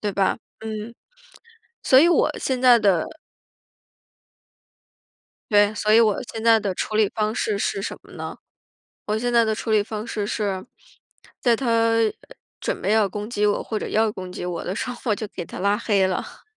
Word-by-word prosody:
对 205 -2 -2
吧？ 195 -1 +1 0.2
嗯， 220 +1 -6 0.9
所 260 - +6
以 330 - +6
我 345 - +3
现 260 -1 -2
在 250 -2 +7
的 195 -6 +2 2.5
对， 205 0 +4
所 215 +1 +1
以 230 - +7
我 215 -3 +4 0.2
现 225 - -6
在 230 0 +5
的 195 -3 -2
处 215 - -3
理 215 -2 +3
方 215 0 -1
式 205 -2 -1
是 195 - -1
什 - - -5
么 - - -16
呢？ - - -7 0.7
我 215 +1 +1
现 245 +1 -1
在 235 -1 +5
的 220 - 0
处 220 +1 -3
理 210 - +4
方 215 +1 -6
式 210 -3 -3
是， 205 -3 -2 0.8
在 235 -2 +3
他 230 -2 +2 0.6
准 - - -3
备 210 - 0
要 220 -2 +3
攻 210 +2 -6
击 210 -3 -1
我， 205 -1 +2
或 220 - -4
者 - - -4
要 220 0 +1
攻 185 -2 -7
击 180 - -6
我 175 -2 -4
的 185 - -4
时 245 - -3
候 245 - -6
我 205 - +2
就 215 - -4
给 175 - -5
他 - - -9
拉 200 +2 +2
黑 205 -4 +2
了。 185 - -5
215 Hz, 205 characters per minute, -23 LUFS, 205-230 Hz, 2.5 s, 在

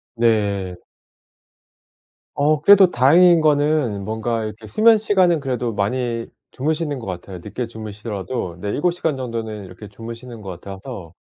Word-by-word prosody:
네. 100 -5 +1 1.6
어 150 +1 +2
그래도 200 -2 +7
다행인 170 +7 +5
거는 145 -8 +2
뭔가 110 +1 -2
이렇게 110 +1 -7
수면 220 - +5
시간은 185 -6 +2
그래도 125 -4 -2
많이 115 +3 -1 0.3
주무시는 150 +1 -2
것 125 - -8
같아요. 90 0 -6
늦게 115 +4 -4
주무시더라도 105 -3 -5
네 100 - -4
7 175 - +1
시간 160 -5 -2
정도는 115 -5 -5
이렇게 90 +3 -11
주무시는 115 +3 -9
것 95 - -8
같아서 95 -2 -9
115 Hz, 310 characters per minute, -21 LUFS, 105-150 Hz, 1.6 s, 그래도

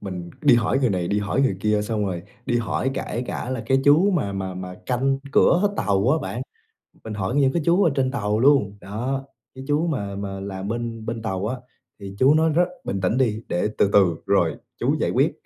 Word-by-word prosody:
mình 90 -3 -6
đi - - +6
hỏi 120 +3 +2
người 125 -5 +2
này, 90 -2 -1
đi 105 - +1
hỏi 105 +6 0
người 115 -9 +1
kia, 105 0 +1
xong 105 -1 -1
rồi 90 -2 -4 0.2
đi 120 - +1
hỏi 120 +4 -1
kể 120 -2 -3
cả 125 - -4
là 125 -3 -3
cái 135 +1 +3
chú 160 +8 +5
mà 145 - 0
mà 95 -1 -4
mà 90 0 -6
canh 135 +2 +1
cửa 195 +4 +4
tàu 100 +3 +1
á, 160 - +3
bạn, - - -4 0.6
mình 110 - -6
hỏi 100 +5 -2
những 135 -2 +3
cái 170 - 0
chú 175 +4 +4
ở 165 - +3
trên 130 -1 +1
tàu 105 -4 -1
luôn. 125 -7 +3
Đó, 125 +7 -3 0.3
cái 130 - -8
chú 150 +4 +1
mà 100 -10 -3
mà 100 -1 -5
làm 95 0 -5
bên 115 0 -4
bên 115 0 -4
tàu 95 -1 -2
á, 130 - -2 0.4
thì 100 0 -8
chú 135 +3 +6
nói 160 +1 +3
rất 175 +3 +3 0.2
bình 95 -1 -3
tĩnh 100 +7 +1
đi 115 -4 +1
để 90 +4 0
từ 100 - +3
từ 95 -5 +5
rồi - - +2 0.2
chú - - +1
giải - - +1
quyết. - - +2
110 Hz, 230 wpm, -23 LUFS, 100-135 Hz, 0.6 s, đi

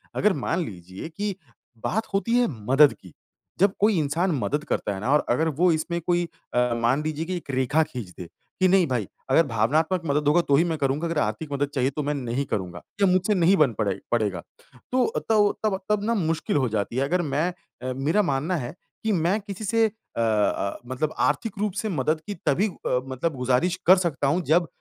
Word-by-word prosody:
अगर 210 -2 +3
मान 180 - -1
लीजिए 95 - -8
कि 205 -2 -2 0.5
बात 220 +3 -1
होती 230 +5 +1
है 245 - +3 0.2
मदद 145 +1 +7
की, 90 -4 -16 0.5
जब 195 +1 +4
कोई 210 -2 +3
इंसान 165 +5 0
मदद 150 +4 -1
करता 105 - -1
है 95 - -6
ना 125 - 0
और 150 - +3
अगर 160 +7 +2
वह 180 -1 +5
इसमें 170 +2 -2
कोई 175 +1 0 0.3
अ, 125 0 +2
मान 130 +6 +2
लीजिए 155 +1 -3
कि 180 +1 -3
एक 145 - -7
रेखा 135 +5 +2
खींच 120 -10 -7
दे, 90 - -7 0.3
कि 185 - +5
नहीं 185 -1 +4
भाई, 120 -7 -1 0.2
अगर 150 +5 +5
भावनात्मक 155 - +1
मदद 145 0 0
होगा 160 +4 +5
तो 140 -4 +2
ही 160 - +4
मैं 165 -2 -1
करूँगा 145 +3 0
अगर 165 -2 -2
आर्थिक 145 +8 -2
मदद 140 0 0
चाहिए 130 -1 +2
तो 150 - -1
मैं 145 +1 -1
नहीं 130 0 -2
करूँगा, 90 -7 -4 0.2
या 195 - +6
मुझसे 185 +3 +2
नहीं 180 +1 +4
बन 145 -8 +4
पड़े 100 -3 +1 0.2
पड़ेगा। 110 -5 0 0.5
तो 255 0 +3 0.2
तब 210 -2 +5 0.2
तब 200 -3 +1
तब 210 -1 +1
ना 230 +2 +1
मुश्किल 165 -5 -1
हो 130 -4 +1
जाती 105 +1 -2
है 135 - +2
अगर 175 +6 +1
मैं 150 +1 0 0.4
अ, - - -2
मेरा 145 +10 +1
मानना 155 +1 0
है 135 +1 -5 0.3
कि 220 - +1
मैं 180 +2 +1
किसी 200 +1 -7
से 225 +2 +3
अ 220 - -11
अ, 105 -3 +1
मतलब 130 +5 -2
आर्थिक 205 +8 0
रूप 210 -3 0
से 220 - -3
मदद 155 -1 0
की 205 - -3
तभी 185 +10 +2
अ, 130 -9 -2
मतलब 135 +4 -2
गुज़ारिश 130 +8 +1
कर 185 +2 +8
सकता 140 -3 -1
हूँ 170 +6 +2
जब 170 +2 +3
155 Hz, 215 wpm, -25 LUFS, 130-185 Hz, 0.5 s, कर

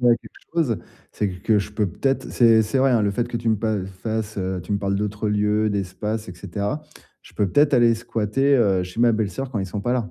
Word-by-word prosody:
penser 120 -1 +5
à 115 - +3
quelque - - -16
chose, 155 -10 +1 0.3
c'est 105 - -1
q 90 -1 -8
que 110 -2 +3
je 100 - -6
peux 105 0 0
peut-être 135 +9 -1
c'est 115 -2 +5
c'est 110 +5 -1
vrai, 135 +1 +4
hein, 120 -3 +3
le 100 - +2
fait 120 +4 -1
que 120 - -3
tu 115 0 -2
me 110 - +3
pa 105 -2 -1 0.2
fasses, 110 -1 -3
heu, 95 -1 -2
tu 90 - -5
me 100 - +1
parles 100 0 -1
d'autres 105 +1 -2
lieux, 105 +1 +1
d'espace 105 +2 -3
et 90 - -7
cetera, 100 - -4 0.4
je - - -17
peux 100 - 0
peut-être 145 +7 +3
aller 120 -1 +5
squatter, 115 +4 +1
heu, 100 -6 +3
chez 90 +3 -8
ma 120 -1 +5
belle-sœur 110 +5 -2
quand 115 - -2
ils 95 - -2
sont 100 +2 -4
pas 120 +4 0
là. 120 -4 -1
110 Hz, 260 wpm, -23 LUFS, 100-120 Hz, 0.4 s, penser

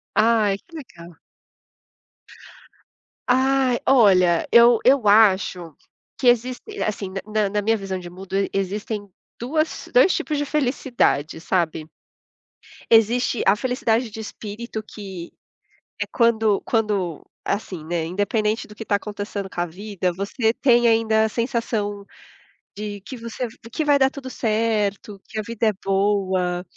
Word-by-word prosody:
Ai, 215 -3 +3
que 330 - -13
legal. 170 - -12 2.1
Ah, 260 -1 +3
olha, 185 -9 +4
eu 235 -1 +7
eu 260 -3 +4
acho 190 -6 +3 0.4
que 250 - +2
existe, 245 +1 +2 0.2
assim, 200 -2 -3
na 195 0 -4 0.2
na - - 0
na 210 0 -1
minha 225 +2 +2
visão 195 -2 -4
de 175 -1 -9
mundo 190 +1 -9 0.2
existem 205 +2 -3 0.3
2 310 +6 -2
2 - - +5
tipos 300 -2 -2
de 290 - 0
felicidade, 245 - 0
sabe? 165 -3 -1 1.1
Existe 230 +2 +3
a 195 - +6
felicidade 240 -1 0
de 220 - -9
espírito, 220 +1 -7
que 190 -5 -9 0.7
é - - +1
quando 225 -4 +2
quando 205 -8 -1 0.2
assim, 190 -5 -3
né, 165 0 -2
independente 210 +5 -1
do 210 - -13
que 225 - -7
está 205 - 0
acontecendo 205 -1 -5
com 175 - -7
a 175 - +1
vida, 185 0 -3
você 220 +5 -1
tem 240 -3 +3
ainda 220 -1 +3
a - - -1
sensação 225 -4 -2 0.7
de 205 -1 -5
que 255 +6 -9
você 230 +1 -5 0.2
que 315 - -1
vai 290 -1 +3
dar 265 0 +4
tudo 270 -2 -8
certo, 215 -3 -1
que 220 - -9
a - - 0
vida 230 -1 -1
é 215 - +2
boa. 190 -3 0
215 Hz, 140 wpm, -22 LUFS, 195-235 Hz, 2.1 s, eu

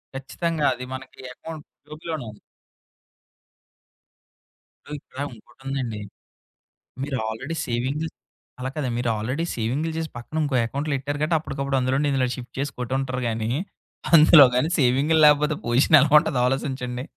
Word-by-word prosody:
ఖచ్చితంగా 155 +3 -2
అది 125 +1 -7
మనకి 130 0 -9
అకౌంట్ 160 +1 -9 0.2
టూబులోన 155 0 -6
ఉన్ 105 - -17 2.5
డు - - -13
ఇక్కడా 135 +2 -7
ఇంకోటుందండి. 130 -1 -6 1.0
మీరు 135 -1 -2
ఆల్రెడీ 135 +9 -5
సేవింగ్ 130 +6 -2 0.5
అలా 130 +1 -3
కదండి. 140 -5 -2
మీరు 120 - 0
ఆల్రెడీ 130 +10 -2
సేవింగులు 135 +8 -2
చేసి, 160 -1 -3
పక్కన 135 +6 -7
ఇంకో 140 -3 -1
అకౌంట్లు 140 +5 -3
ఎట్టారు 145 +2 -4
కాట్టి, 160 +2 +2
అప్పటికప్పుడు 140 -2 -2
అందులోడి 135 +3 +1
ఇందులో 130 -2 +1
షిఫ్ట్ 125 -1 -10
చేసి 140 +1 -2
కొటు 125 +1 -3
ఉంటారు 130 -1 -3
గానీ, 110 0 -2 0.7
అందులోగానీ 150 -3 +7
సేవింగ్లు 140 +5 +3
లేకపోతే 150 +1 +4
పోజిషన్ 130 +6 +5
ఎలా 150 0 +2
ఉంటదా 140 -4 -1
ఆలోచించండి. 130 -2 -3
135 Hz, 135 wpm, -24 LUFS, 125-150 Hz, 2.5 s, అందులోగానీ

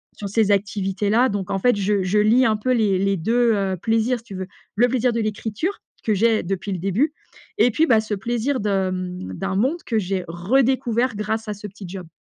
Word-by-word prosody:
sur 205 - -6
ces 210 0 +2
activités-là. 200 +4 +1
Donc 200 -2 -3
en 195 - 0
fait, 245 +3 +3
je 200 -1 +1
je 190 +3 +1
lie 230 +5 +4
un 215 -1 +2
peu 255 +4 -1
les 210 -5 +2
les 195 0 +1
2, 230 +6 +2
heu, 195 -2 -1
plaisirs, 225 +2 +1
si 225 - -21
tu 195 - -9
veux. 185 0 -5 0.3
Le 240 +4 +4
plaisir 250 -1 +1
de 230 - -1
l'écriture 220 - -3 0.2
que 220 - +1
j'ai 225 +2 +2
depuis 195 +2 -3
le 185 - -2
début, 210 - 0 0.5
et - - +6
puis, 320 +8 +3
bah, 220 -2 +5
ce 215 -1 -3
plaisir 240 +6 -1
de, 195 -2 0
mmh, 185 0 -5
d'un 195 0 -3
monde 265 - 0
que 225 -2 0
j'ai 190 -2 -2
redécouvert 240 +6 +1
grâce 220 +2 -2
à 210 - -2
ce 205 +1 -8
petit 195 0 -11
job. 180 -2 -8
210 Hz, 220 wpm, -22 LUFS, 195-235 Hz, 0.5 s, et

